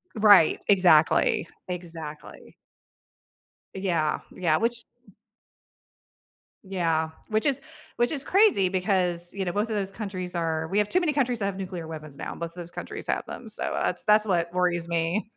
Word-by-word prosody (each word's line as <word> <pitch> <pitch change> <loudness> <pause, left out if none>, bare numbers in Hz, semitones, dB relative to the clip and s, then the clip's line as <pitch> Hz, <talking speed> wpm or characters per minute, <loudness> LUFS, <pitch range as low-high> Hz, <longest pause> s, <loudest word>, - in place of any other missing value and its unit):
Right. 205 -6 +6
Exactly. 175 -4 +4 0.2
Exactly. 165 -4 -8 1.2
Yeah. 175 -5 0 0.2
Yeah. 160 -4 +2
Which 230 0 +1 1.8
Yeah, 165 -4 0 0.2
which 215 0 +1
is 280 -2 +2 0.4
which 240 0 +2
is 285 -3 -1
crazy 375 - +4
because, 180 -2 +1
you 195 -1 -3
know, 175 - -2
both 210 +4 -1
of 220 - -2
those 195 -2 -2
countries 190 -4 -5
are 160 -2 -2
we 195 - -1
have 210 -1 +3
too 365 - +3
many 335 -3 +1
countries 255 -5 0
that 200 - -1
have 200 -1 -3
nuclear 180 -4 -6
weapons 155 -3 -8
now. - - -5
Both 170 0 -5
of - - -18
those 175 -1 -8
countries - - -7
have - - -1
them. - - -8
So, - - -1
uh, - - -2
that's - - -2
that's 210 0 +5
what 170 -4 0
worries 175 -2 +1
me. 170 +5 -1
185 Hz, 170 wpm, -26 LUFS, 170-210 Hz, 1.8 s, Right